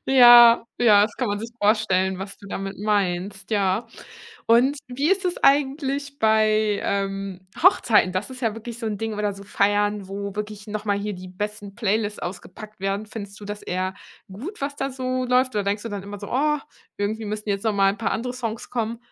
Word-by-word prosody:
Ja, 240 -3 +8 0.2
ja, 210 -4 +6
das 215 +1 -1
kann 250 -4 -1
man 205 0 -1
sich 230 +2 -6
vorstellen, 190 -3 +2
was 195 +1 -7
du 200 - -13
damit 195 0 -5
meinst. 200 -1 -1
Ja. 200 +1 +1 0.6
Und 255 +5 +4
wie 275 +7 0
ist 390 -1 +2
es 355 - -1
eigentlich 280 0 +1
bei, 215 -1 +3
ähm, 195 -2 -3 0.2
Hochzeiten? 230 - +5
Das 195 +5 -3
ist 255 0 -9
ja 225 -3 0
wirklich 230 +1 -8
so 230 - -4
'n 210 -2 -2
Ding 225 +1 -3
oder 205 -1 -1
so 200 - -11
Feiern, 205 0 +1
wo 200 0 -5
wirklich 210 0 -6
noch 215 0 -5
mal 205 -1 +2
hier 205 +1 -3
die 185 0 -9
besten 205 +1 -6
Playlists 210 -1 -1
ausgepackt 195 +3 -8
werden? 195 +2 -1
Findest 200 -2 -8
du 205 - -10
das 205 0 -6
eher 185 +1 -2 0.4
gut, 280 - -8
was 285 0 -3
da 270 - -2
so 255 0 -2
läuft 250 -1 +2
oder 205 - 0
denkst 205 +1 -1
du 230 - -6
dann 200 -2 -5
immer 205 0 -8
so: 205 - -8
„Oh, 300 +3 +2 0.4
irgendwie 215 +2 -2
müssten 210 0 -4
jetzt 200 +1 -2
noch 220 -2 +1
mal 195 -1 +4
'n 205 - -10
paar 225 - -1
andere 245 +2 -2
Songs 230 -3 -5
kommen?“ 230 -1 -2
210 Hz, 205 wpm, -23 LUFS, 200-235 Hz, 0.6 s, Ja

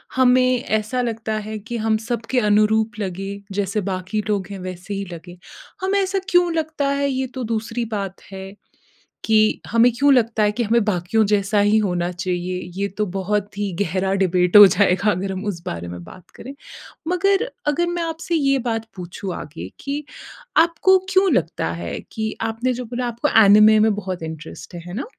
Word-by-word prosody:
हमें 255 0 +4 0.2
ऐसा 220 +4 -2
लगता 225 -2 -3 0.2
है 215 - -4
कि 240 - -2
हम 220 -1 +2
सबके 240 +2 -1
अनुरूप 215 0 +2
लगें। 195 +1 -5 0.2
जैसे 205 +1 -1
बाक़ी 185 +3 -2
लोग 200 -3 0
हैं 195 - -6
वैसे 185 +3 -7
ही 200 0 -3
लगें। 175 +1 -11 0.4
हमें 390 +1 +1
ऐसा 385 0 0
क्यों 355 -1 +3
लगता 315 -3 -1
है 280 0 0
ये 260 0 -1
तो 250 - -2
दूसरी 230 +2 -3
बात 195 -1 -5
है। 190 0 -8 0.7
कि 220 - +3 0.3
हमें 230 +2 +4
क्यों 285 +1 +5
लगता 230 -3 +2
है 210 0 +3
कि 240 - +2
हमें 230 0 +2
बाक़ियों 210 +2 +1
जैसा 205 0 +2
ही 205 +2 +4
होना 180 -4 0
चाहिए, 180 0 -3
ये 200 +2 -1
तो 210 - +1
बहुत 205 +1 -2
ही 205 -2 -2
गहरा 190 +1 0
डिबेट 180 +1 +3
हो 205 - +12
जाएगा 195 0 +3
अगर 190 0 -2
हम 190 +2 -5
उस 185 -5 -3
बारे 85 +1 -5
में 90 - -9
बात 185 - -15
करें। 265 +4 -9 0.5
मगर 390 +4 +2 0.2
अगर 340 +4 +1
मैं 345 - -1
आपसे 330 +1 -3
ये 275 -3 +2
बात 225 -1 -2
पूछूँ 180 +1 -6
आगे 155 +2 -8
कि 285 +2 -4 0.6
आपको 340 +3 +3 0.2
क्यों 380 0 +4
लगता 160 - -1
है 85 -1 -4
कि 220 -1 -3 0.2
आपने 240 +3 -1
जो 250 +1 -5
बोला 245 0 -2
आपको 235 0 -1 0.2
एनीमे 215 +2 +7
में 215 0 +3
बहुत 190 -4 -5
इंटरेस्ट 160 +2 -8
है, 175 - -6
है 175 - -8
ना? 240 - -3
215 Hz, 185 wpm, -21 LUFS, 190-250 Hz, 0.7 s, हो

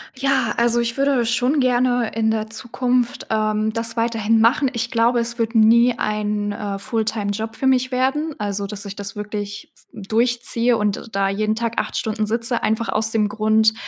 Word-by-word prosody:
Ja, 270 0 +1
also, 235 0 +3
ich 235 -1 -1
würde 275 -3 +2
schon 250 +5 +1
gerne 245 -2 +2
in 220 0 +1
der 220 0 -1
Zukunft, 245 +1 -1
ähm, 215 0 0
das 230 0 -2
weiterhin 225 -1 +1
machen. 245 +5 +3
Ich 235 -1 -3
glaube, 235 +1 +2
es 235 0 -3
wird 230 0 -1
nie 235 +2 +5
ein, 210 -1 -1
äh, 205 -1 -4
Fulltime-Job 220 0 -3
für - - -4
mich 255 -1 +3
werden. 275 +5 0
Also, 200 -1 -3
dass 205 +1 -6
ich 200 - -7
das 200 -1 -6
wirklich 205 0 -6 0.2
durchziehe 235 +2 0
und 210 +2 -2
da 195 0 +1
jeden 215 +2 0
Tag 230 0 -2
8 - - -3
Stunden 215 -1 -2
sitze. 230 +2 0
Einfach 220 +1 0
aus 220 +1 0
dem 220 -2 +1
Grund, 220 +1 +2
225 Hz, 175 wpm, -21 LUFS, 215-240 Hz, 0.2 s, nie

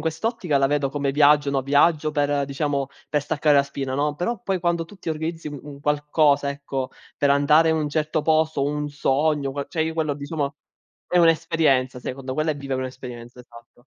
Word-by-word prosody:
quest'ottica 165 - -1
la 135 - +3
vedo 145 0 0
come 140 0 -2
viaggio, 145 0 +4
no, 140 -1 +1
viaggio 145 +3 +3
per 145 -1 0
diciamo 140 0 -1 0.2
per 150 - +2
staccare 150 0 +1
la 140 - +6
spina, 140 -1 -5
no. 145 +2 0
Però 200 +7 -2
poi 190 -1 -1
quando 170 -1 0
tu 205 - -15
ti 170 - -5
organizzi 160 +1 -4
un 145 -1 -9
qualcosa, 145 -1 +2
ecco, 140 -2 -4 0.3
per 140 - +2
andare 150 +3 +4
in 160 - +2
un 155 -1 -1
certo 155 +1 -1
posto, 155 -2 +2
un 150 +1 -2
sogno, 145 0 0
que 140 0 -4
cioè 160 - -1
io 160 0 -2
quello 155 -3 -1
di 140 0 -8
soma 145 -1 -2 0.6
è 180 - +1
un'esperienza 160 -6 +2
secondo 130 +1 -5
quella 155 +3 0
è 145 - -9
vivere 135 -2 -3
un'esperienza, 125 -2 -8
esatto. 120 0 -17
145 Hz, 195 wpm, -23 LUFS, 140-160 Hz, 0.6 s, la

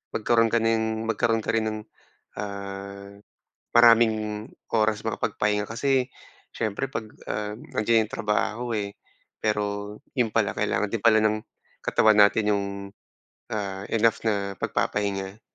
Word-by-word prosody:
magkaroon 115 +1 +3
ka 115 0 +1
ng 110 -1 +1
magkaroon 115 0 +1
ka - - 0
rin 115 -1 +1
ng, 110 0 -3 0.6
ah, 100 0 -7 0.6
maraming 110 -2 +4 0.2
oras 110 0 +1
makapagpahinga. 105 -1 -1
Kasi 130 +2 +1 0.4
siyempre 110 +5 -2
'pag, 110 -4 -4 0.2
ah, 105 0 -2
nandiyan 110 -4 0
yung - - -6
trabaho, 110 +3 -1
eh, 100 -1 -3 0.4
pero 105 -1 -1 0.2
yun 115 -3 +1
pala, 105 -4 +1
kailangan 105 0 0
din 115 -2 -3
pala 110 -2 +6
ng 110 0 +2 0.5
katawan 110 -1 +4
natin 105 +1 +5
yung, 100 -1 +1 0.9
ah, 100 -3 -3
enough 115 0 +2
na 100 -3 -1
pagpapahinga. 100 +1 -2
110 Hz, 125 wpm, -26 LUFS, 105-115 Hz, 0.9 s, pala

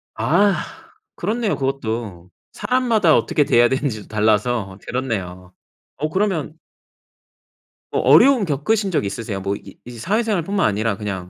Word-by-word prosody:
아. 175 - +2 0.6
그렇네요 215 +3 -1
그것도. 115 - -4 0.2
사람마다 230 - +2
어떻게 120 +6 +1
대해야 120 -3 +4
되는지도 130 -7 -2
달라서 110 -1 0
그렇네요. 95 -8 -4 0.4
어 155 +3 -2
그러면 170 -4 -2 1.3
뭐 - - 0
어려움 265 -6 +5
겪으신 195 +7 0
적 160 - 0
있으세요? 100 0 -4
뭐 100 +1 -2
이 - - -12
이제 120 -1 -10
사회생활뿐만 200 - 0
아니라 105 +1 -1
그냥 95 -4 -5
130 Hz, 320 characters per minute, -20 LUFS, -, 1.3 s, 어려움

